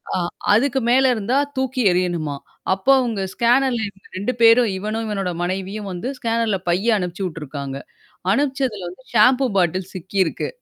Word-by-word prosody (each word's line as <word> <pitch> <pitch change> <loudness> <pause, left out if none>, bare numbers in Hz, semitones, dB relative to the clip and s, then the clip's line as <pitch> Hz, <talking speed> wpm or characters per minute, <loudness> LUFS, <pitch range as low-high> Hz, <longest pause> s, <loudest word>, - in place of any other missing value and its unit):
அ - - +1 0.4
அதுக்கு 265 +5 +2
மேல 260 +2 +5
இருந்தா 235 +3 0 0.2
தூக்கி 260 0 -1
எரியணுமாம். 170 -5 -1 0.3
அப்போ 195 +8 +2
அவங்க 230 -6 -1
ஸ்கேனர்ல 245 +1 +2
இருக்கற 195 -2 -11
2 205 +7 -1
பேரும் 230 0 +6
இவனும், 215 +3 -3
இவனோட 195 -4 -2
மனைவியும் 195 +3 -3
வந்து 180 +6 -5
ஸ்கேனர்ல 230 -3 0
பைய 205 +6 +2
அனுப்பிச்சு 180 +1 -3
விட்டுருக்காங்க. 140 -5 -5 0.5
அனுப்பிச்சதுல 260 -5 0
வந்து 185 +9 -14
ஷாம்பூ 250 +4 +5
பாட்டில் 180 0 +1
சிக்கியிருக்கு. 185 -1 -1
210 Hz, 140 wpm, -21 LUFS, 185-245 Hz, 0.5 s, பேரும்